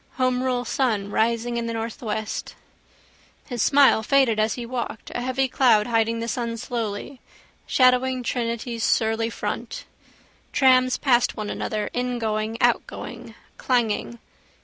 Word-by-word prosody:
Homerule 255 Hz, -1 st, 0 dB
sun 220 Hz, -6 st, 0 dB
rising 235 Hz, +2 st, 0 dB
up -, -, +1 dB
in 230 Hz, -, -3 dB
the 230 Hz, -, -3 dB
northwest. 220 Hz, -1 st, -4 dB, 0.9 s
His 245 Hz, -4 st, -4 dB
smile 275 Hz, -4 st, +5 dB
faded 235 Hz, -2 st, +3 dB
as 215 Hz, 0 st, +1 dB
he 240 Hz, -, -5 dB
walked, 235 Hz, -2 st, -5 dB
a 245 Hz, -, -3 dB
heavy 260 Hz, +1 st, 0 dB
cloud 235 Hz, -5 st, +3 dB
hiding 230 Hz, 0 st, +1 dB
the 230 Hz, -, -3 dB
sun 235 Hz, -1 st, -3 dB
slowly, 230 Hz, +2 st, -5 dB, 0.5 s
shadowing 255 Hz, 0 st, +3 dB
Trinity's 235 Hz, -1 st, -3 dB
surly 225 Hz, 0 st, +1 dB
front. -, -, -5 dB, 0.7 s
Trams 255 Hz, -2 st, +4 dB
passed 245 Hz, -4 st, +2 dB
one 210 Hz, -1 st, -4 dB
another, 215 Hz, -1 st, -3 dB
ingoing, 225 Hz, -3 st, -2 dB
outgoing, 240 Hz, -, -1 dB, 0.2 s
clanging. 235 Hz, -2 st, 0 dB
235 Hz, 125 wpm, -24 LUFS, 225-255 Hz, 0.9 s, smile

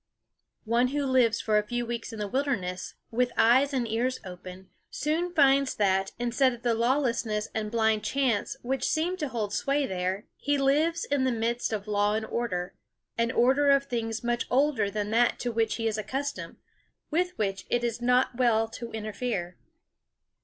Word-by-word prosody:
One 235 Hz, +3 st, +2 dB
who 285 Hz, +2 st, -1 dB
lives 250 Hz, -4 st, +3 dB
for 215 Hz, -1 st, +2 dB
a 210 Hz, -, -5 dB
few 240 Hz, +1 st, -2 dB
weeks 235 Hz, 0 st, -4 dB
in 225 Hz, -, -7 dB
the 210 Hz, -1 st, -3 dB
wilderness, 195 Hz, -8 st, -2 dB, 0.2 s
with 245 Hz, +1 st, +1 dB
eyes 260 Hz, +5 st, +5 dB
and 255 Hz, -4 st, -1 dB
ears 240 Hz, +4 st, -1 dB
open, 185 Hz, 0 st, -10 dB, 0.2 s
soon 325 Hz, +4 st, -1 dB
finds 275 Hz, -4 st, +4 dB
that, 195 Hz, -1 st, +1 dB
instead 245 Hz, +2 st, +2 dB
of 235 Hz, -, -11 dB
the 240 Hz, -1 st, +2 dB
lawlessness 235 Hz, -3 st, 0 dB
and 215 Hz, -1 st, -2 dB
blind 220 Hz, -1 st, +1 dB
chance 260 Hz, -6 st, 0 dB
which 260 Hz, +1 st, -2 dB
seem 335 Hz, +4 st, 0 dB
to 305 Hz, -4 st, -2 dB
hold 220 Hz, -5 st, -3 dB
sway 280 Hz, +4 st, +1 dB
there, 185 Hz, 0 st, -2 dB
he 285 Hz, 0 st, 0 dB
lives 300 Hz, +5 st, +2 dB
in 280 Hz, -2 st, 0 dB
the 260 Hz, -, +2 dB
midst 235 Hz, +1 st, -1 dB
of 210 Hz, -1 st, -3 dB
law 205 Hz, 0 st, +1 dB
and 220 Hz, 0 st, -2 dB
order 205 Hz, -7 st, -3 dB, 0.4 s
an 230 Hz, 0 st, +1 dB
order 265 Hz, +4 st, +3 dB
of 275 Hz, 0 st, +5 dB
things 230 Hz, -4 st, -3 dB
much 240 Hz, 0 st, -1 dB
older 260 Hz, -6 st, +2 dB
than 210 Hz, 0 st, -3 dB
that 235 Hz, +2 st, +3 dB
to 245 Hz, -, -1 dB
which 225 Hz, -1 st, 0 dB
he 225 Hz, -, -3 dB
is 215 Hz, -1 st, -1 dB
accustomed, 275 Hz, +6 st, -4 dB, 0.6 s
with 360 Hz, +3 st, 0 dB
which 195 Hz, -3 st, -2 dB
it 240 Hz, 0 st, +1 dB
is 235 Hz, 0 st, -2 dB
not 250 Hz, +1 st, +2 dB
well 230 Hz, -3 st, +2 dB
to 235 Hz, +1 st, -7 dB
interfere. 215 Hz, -4 st, -3 dB
235 Hz, 180 wpm, -28 LUFS, 215-265 Hz, 0.6 s, eyes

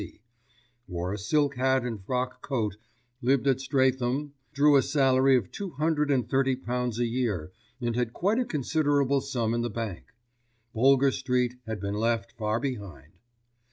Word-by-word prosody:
C., 90 Hz, -, -10 dB, 0.7 s
wore 90 Hz, +1 st, -3 dB
a -, -, -3 dB
silk 140 Hz, +6 st, +1 dB
hat 130 Hz, 0 st, +2 dB
and 110 Hz, -5 st, -5 dB
frock 125 Hz, +3 st, -2 dB
coat, 110 Hz, -7 st, -2 dB, 0.5 s
lived 135 Hz, +2 st, +2 dB
at 135 Hz, -1 st, +2 dB
Streatham, 130 Hz, +1 st, 0 dB, 0.2 s
drew 145 Hz, 0 st, +4 dB
a 135 Hz, -, +6 dB
salary 135 Hz, -1 st, +3 dB
of 105 Hz, -7 st, -4 dB
two 195 Hz, -3 st, -6 dB
hundred 150 Hz, +1 st, 0 dB
and 130 Hz, -5 st, +1 dB
thirty 135 Hz, +1 st, +2 dB
pounds 125 Hz, -2 st, -3 dB
a 120 Hz, -, +1 dB
year 115 Hz, -9 st, -2 dB, 0.3 s
and 120 Hz, -2 st, -2 dB
had 120 Hz, -2 st, 0 dB
quite 200 Hz, -, 0 dB
a 250 Hz, -, +1 dB
considerable 145 Hz, -, +1 dB
sum 120 Hz, -5 st, -1 dB
in 120 Hz, -, 0 dB
the 120 Hz, -, -1 dB
bank. 110 Hz, -5 st, -5 dB, 0.7 s
Boulger 135 Hz, +3 st, +4 dB
Street 125 Hz, -2 st, 0 dB
had 110 Hz, -2 st, -4 dB
been 100 Hz, +1 st, -3 dB
left 110 Hz, -1 st, 0 dB
far 110 Hz, -1 st, -1 dB
behind. 100 Hz, -, -6 dB
125 Hz, 165 wpm, -27 LUFS, 115-140 Hz, 0.7 s, a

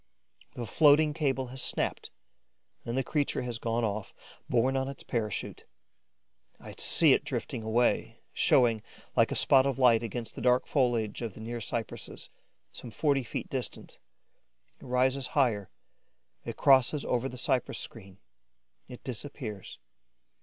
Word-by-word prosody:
The 120 Hz, -, -4 dB
floating 150 Hz, +5 st, +5 dB
cable 135 Hz, -4 st, 0 dB
has 130 Hz, -, -3 dB
snapped -, -, -2 dB, 0.8 s
and 120 Hz, +2 st, -3 dB
the 135 Hz, -, +1 dB
creature 145 Hz, -3 st, -1 dB
has 120 Hz, -2 st, -4 dB
gone 115 Hz, 0 st, -1 dB
off, 105 Hz, -2 st, -3 dB, 0.3 s
borne 125 Hz, +2 st, +2 dB
on 135 Hz, 0 st, 0 dB
its 140 Hz, -1 st, -8 dB
parachute. 110 Hz, -5 st, -3 dB, 1.0 s
I -, -, -10 dB
see -, -, +4 dB
it -, -, +1 dB
drifting -, -, -4 dB
away, 115 Hz, +2 st, +1 dB, 0.2 s
showing, 115 Hz, -4 st, +3 dB, 0.3 s
like -, -, +3 dB
a -, -, -1 dB
spot 135 Hz, 0 st, +5 dB
of 135 Hz, -, -1 dB
light, 125 Hz, -4 st, +5 dB
against 115 Hz, 0 st, -5 dB
the -, -, -8 dB
dark 125 Hz, +1 st, +3 dB
foliage 120 Hz, -7 st, 0 dB
of 115 Hz, -5 st, -5 dB
the -, -, -11 dB
near 115 Hz, +1 st, -5 dB
cypresses, 115 Hz, +1 st, -5 dB, 0.4 s
some 120 Hz, -, -8 dB
forty 135 Hz, +4 st, +1 dB
feet 120 Hz, -, -5 dB
distant. -, -, -5 dB, 0.8 s
It -, -, -12 dB
rises 130 Hz, +2 st, +1 dB
higher, 110 Hz, -8 st, +2 dB, 0.8 s
it -, -, -6 dB
crosses 135 Hz, +2 st, +4 dB
over 125 Hz, +2 st, 0 dB
the 125 Hz, -, -9 dB
cypress 125 Hz, +1 st, 0 dB
screen, 95 Hz, -5 st, -8 dB, 0.7 s
it 125 Hz, -1 st, -11 dB
disappears. 115 Hz, -, -6 dB
125 Hz, 145 wpm, -29 LUFS, 115-135 Hz, 1.0 s, floating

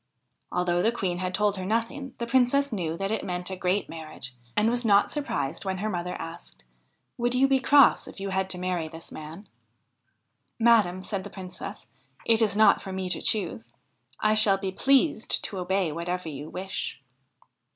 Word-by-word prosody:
Although 175 Hz, 0 st, +1 dB
the 225 Hz, -, +3 dB
Queen 185 Hz, -6 st, -2 dB
had 185 Hz, 0 st, -2 dB
told 205 Hz, +1 st, +1 dB
her 185 Hz, -, -4 dB
nothing, 240 Hz, +5 st, -2 dB
the 235 Hz, -, -3 dB
Princess 260 Hz, +2 st, +2 dB
knew 165 Hz, -5 st, -2 dB
that 195 Hz, +2 st, -2 dB
it 220 Hz, -, -1 dB
meant 180 Hz, +1 st, -3 dB
a -, -, -3 dB
great 185 Hz, +2 st, 0 dB
marriage, 155 Hz, -5 st, -7 dB, 0.2 s
and 210 Hz, +1 st, +4 dB
was 240 Hz, +1 st, 0 dB
not 205 Hz, -3 st, +4 dB
surprised 170 Hz, -, -2 dB
when 190 Hz, -1 st, -2 dB
her 215 Hz, +3 st, -2 dB
mother 180 Hz, 0 st, -3 dB
asked: 165 Hz, -, -9 dB, 0.3 s
' -, -, -48 dB
Would 240 Hz, +1 st, +1 dB
you 265 Hz, +2 st, +4 dB
be 270 Hz, -1 st, +3 dB
cross 280 Hz, 0 st, +5 dB
if -, -, -10 dB
you 195 Hz, 0 st, -4 dB
had 190 Hz, 0 st, 0 dB
to 185 Hz, -, 0 dB
marry 180 Hz, -3 st, -2 dB
this 165 Hz, +1 st, -11 dB
man 160 Hz, +6 st, -9 dB, 0.4 s
?' 120 Hz, -1 st, -48 dB
' -, -, -48 dB
Madam,' 185 Hz, -5 st, +3 dB
said 195 Hz, -2 st, -3 dB
the 205 Hz, -, -8 dB
Princess, 185 Hz, -2 st, -8 dB, 0.2 s
' -, -, -28 dB
it 230 Hz, 0 st, +4 dB
is 210 Hz, -2 st, +2 dB
not 220 Hz, -, +5 dB
for 195 Hz, -, -7 dB
me 190 Hz, -1 st, -3 dB
to -, -, +1 dB
choose; 120 Hz, -, 0 dB, 0.5 s
I 215 Hz, 0 st, +3 dB
shall 215 Hz, -2 st, +5 dB
be 195 Hz, -1 st, -3 dB
pleased 270 Hz, -, +2 dB
to 195 Hz, -, -4 dB
obey 185 Hz, -2 st, 0 dB
whatever 170 Hz, +2 st, -3 dB
you 145 Hz, +1 st, -7 dB
wish.' 190 Hz, +1 st, -5 dB
190 Hz, 200 wpm, -27 LUFS, 175-220 Hz, 0.5 s, cross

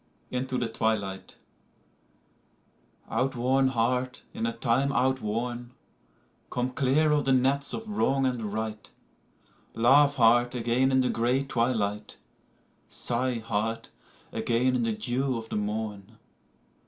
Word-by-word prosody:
INTO 130 Hz, 0 st, -2 dB
THE 120 Hz, -, -1 dB
TWILIGHT 110 Hz, -4 st, -2 dB, 1.7 s
Out 130 Hz, +1 st, -1 dB
worn 130 Hz, +2 st, +2 dB
heart, 125 Hz, +1 st, -1 dB
in 115 Hz, -, -2 dB
a -, -, 0 dB
time 120 Hz, +4 st, +1 dB
out 130 Hz, 0 st, +1 dB
worn, 120 Hz, +3 st, -3 dB, 0.8 s
Come 125 Hz, +1 st, -2 dB
clear 140 Hz, +4 st, +2 dB
of 150 Hz, -1 st, +2 dB
the 135 Hz, -, +3 dB
nets 135 Hz, +2 st, +2 dB
of 225 Hz, -, -5 dB
wrong 135 Hz, -10 st, +1 dB
and 120 Hz, -5 st, -2 dB
right; 110 Hz, 0 st, -4 dB, 0.9 s
Laugh 140 Hz, +5 st, +5 dB
heart 120 Hz, 0 st, +4 dB
again 120 Hz, +3 st, +1 dB
in 130 Hz, 0 st, +4 dB
the 125 Hz, -, +1 dB
gray 125 Hz, +4 st, +1 dB
twilight, 110 Hz, -5 st, -1 dB, 0.7 s
Sigh, 125 Hz, +1 st, -1 dB
heart, 110 Hz, +1 st, -2 dB, 0.4 s
again 125 Hz, +2 st, +1 dB
in 125 Hz, -, +1 dB
the 115 Hz, -1 st, 0 dB
dew 130 Hz, +3 st, -1 dB
of 115 Hz, 0 st, -8 dB
the -, -, -4 dB
morn. 105 Hz, 0 st, -4 dB
120 Hz, 130 wpm, -27 LUFS, 115-130 Hz, 1.7 s, Laugh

